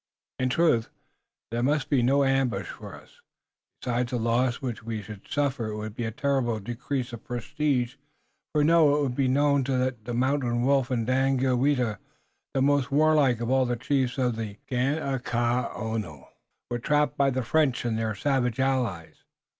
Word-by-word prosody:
In 130 0 +1
truth, 125 -6 +2 0.6
there 120 +1 -1
must 145 +2 +1
be 135 -4 +2
no 135 +4 +3
ambush 135 -2 +1
for - - -9
us. - - -18 0.6
Besides 120 0 -1
the 125 - -1
loss 120 +2 +1
which 125 -4 -5
we 110 -2 -5
should 105 0 -11
suffer 140 -5 -1
it 105 0 -4
would 105 0 -5
be 120 +1 -4
a 110 - -2
terrible 130 -2 0
decrease 125 +4 -4
of 115 - -8
prestige 130 0 -1 0.5
for 150 -1 +2
it - - +3
to 150 -3 +4
be 130 +2 0
known 140 +2 +3
that 130 -4 -1
the 120 - -4
Mountain 125 -2 +1
Wolf 135 -1 +2
and 120 -3 0
Daganoweda, 130 -2 +1 0.6
the 135 - +2
most 140 -1 +2
warlike 145 -5 +3
of 120 +1 -1
all 130 -1 +3
the 120 - 0
chiefs 130 +1 -1
of 125 -3 0
the 110 -2 -5
Ganeagaono, 120 - -1 0.4
were 120 - -1
trapped 150 +1 +1
by 140 -1 +3
the 130 -1 -1
French 135 -1 +1
and 115 -2 0
their 110 -1 -1
savage 125 0 0
allies." 125 -11 -1
125 Hz, 165 wpm, -26 LUFS, 120-140 Hz, 0.6 s, to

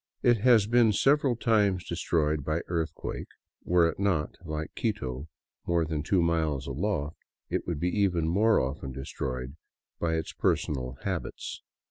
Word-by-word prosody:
It 120 -1 +5
has 115 -2 +5
been 115 -1 +4
several 135 +2 +3
times 105 -6 +2
destroyed 80 -3 0
by 80 +4 -1
earthquake; 85 -2 -3 0.4
were 85 -1 +4
it 85 - -4
not, 95 -7 +1
like 80 -2 -4
Quito, 70 - -2 0.4
more 85 -1 +2
than 75 -1 -2
two 90 +3 +2
miles 80 -5 0
aloft, 75 +1 -2 0.3
it - - -1
would 85 -4 -2
be 90 +4 0
even 90 -5 +2
more 105 +7 +4
often 65 0 -3
destroyed 65 0 -5 0.4
by 80 -1 0
its 80 -1 -3
personal 65 -3 -1
habits. - - -4
85 Hz, 145 wpm, -28 LUFS, 75-100 Hz, 0.4 s, It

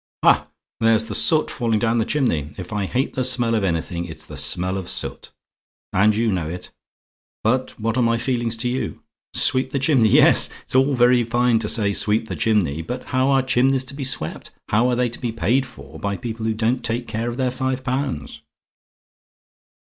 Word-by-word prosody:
"Ha! - - +4 0.3
there's 115 -1 +3
the 110 - -6
soot 155 +9 +2
falling 115 -3 0
down 115 +1 +1
the 110 - +1
chimney. 85 - -1
If 90 +3 -7
I 105 -2 -1
hate 130 +6 -1
the 130 - -1
smell 125 -2 +2
of 110 -3 +1
anything, 85 -1 -2
it's 80 -2 -9
the - - -10
smell 90 +2 -1
of 95 -2 -5
soot. - - -3 0.6
And 105 +3 +4
you 115 0 +1
know 85 -5 -2
it; 90 +2 -8 0.7
but 130 +3 0
what 115 +2 -1
are - - +3
my 115 -1 +2
feelings 120 -1 -1
to 120 +2 -2
you? 125 +2 -3 0.3
SWEEP 130 0 +2
THE 140 - -2
CHIMNEY! 130 -5 +3
Yes, - - +5
it's - - -10
all 135 +2 +3
very 125 0 +4
fine 120 0 +2
to 105 -2 -2
say 100 -3 +2
sweep 110 +2 0
the - - -3
chimney 100 -10 +1
but 125 +10 -5
how 130 +1 +2
are 135 -1 +3
chimneys 130 +1 +2
to 130 - -7
be 140 0 -5
swept 125 -12 -2 0.2
how 115 +4 +3
are 125 - +1
they 125 0 +1
to 120 - -6
be 120 - -2
paid 115 +6 +1
for 75 - -12
by 100 +3 -2
people 115 0 -5
who 110 - 0
don't 115 +3 0
take 120 +1 -2
care 115 +2 -3
of 120 - -6
their 130 -2 0
five 130 0 -2
pounds? 130 - -3
115 Hz, 205 wpm, -21 LUFS, 105-130 Hz, 0.7 s, Yes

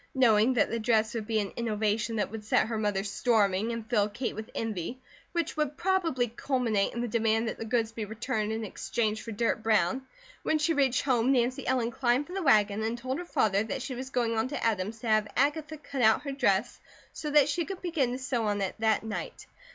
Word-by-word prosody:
Knowing 240 -1 +4
that - - +2
the 230 - -1
dress 220 -1 +2
would 220 -3 -4
be 220 -2 +1
an 200 -2 -3
innovation 220 -1 -1
that 210 -2 -1
would 220 -1 -6
set 215 - +2
her 225 +1 -3
mother 205 -2 0
storming 210 0 +1
and 230 -1 -5
fill 210 -3 +2
Kate 240 +4 -3
with 220 0 -7
envy, 225 +2 -3 0.3
which 340 -1 -2
would 300 -2 -1
probably 340 -10 +1
culminate 235 -3 0
in 240 - -2
the 240 - -1
demand 225 0 +1
that - - -4
the 225 - -4
goods 225 -1 0
be 225 -1 -5
returned 220 0 -2
and 220 0 -3
exchanged 215 +1 -2
for 230 - -7
dirt 225 +1 0
brown, 215 +1 +2 0.4
when 315 - +1
she 310 +2 +1
reached 270 -4 +2
home 255 -2 +2
Nancy 255 +1 +1
Ellen 245 -2 +1
climbed 250 +3 +1
from 355 - -10
the 390 - -2
wagon 210 - +3
and 225 +2 -1
told 260 +4 -3
her 355 - -5
father 205 - +2
that 250 +3 -4
she 265 - -4
was 260 +1 -6
going 235 -3 0
on 220 +2 +1
to 285 - -4
Adam's 215 0 0
to 235 - -5
have 215 -1 +3
Agatha 300 +3 +1
cut 280 -2 -5
out 220 +4 +4
her 280 - -3
dress 210 -6 +1 0.3
so 300 - -5
that 295 -2 +5
she 335 +4 0
could 375 +2 -7
begin 315 -8 0
to - - -3
sew 255 -3 -1
on 205 -1 0
it 190 - -1
that 220 -1 +2
night. 220 -1 -5
230 Hz, 230 wpm, -29 LUFS, 215-260 Hz, 0.4 s, that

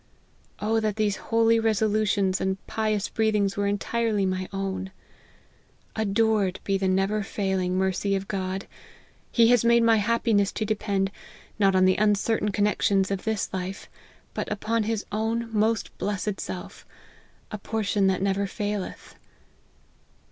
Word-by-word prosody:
O 220 +2 +1
that 215 -2 -1
these 210 -2 0
holy 230 0 +4
reso 220 -1 +2
lutions 205 -3 +1
and 190 0 0
pious 215 -2 -1
breathings 210 -3 +1
were 200 0 0
entirely 210 0 0
my 185 0 -2
own! 190 -1 -3 1.1
Adored 215 -2 +1
be 195 - 0
the 190 0 0
never 195 +3 +1
failing 190 -2 -1
mercy 190 +1 0
of 195 0 -3
God! 190 -1 -3 0.7
He 230 -1 +5
has 245 -2 +4
made 235 0 +5
my 225 -1 +5
happiness 210 -2 +2
to 215 - -2
depend, 200 -2 -1 0.5
not 195 -2 +4
on 185 0 +5
the 185 0 +3
un 210 -1 +4
certain 210 +1 0
connexions 200 -1 +1
of 195 -2 -3
this 220 -2 -1
life, 190 +1 -5 0.4
but - - -4
upon 225 +2 0
his 220 -1 -2
own 225 +2 -2
most 220 0 +1
blessed 205 0 -2
self, - - -7 0.7
a 215 - -5
portion 205 -2 0
that 190 0 +1
never 200 0 0
faileth. 205 -1 -4
205 Hz, 145 wpm, -26 LUFS, 195-220 Hz, 1.1 s, He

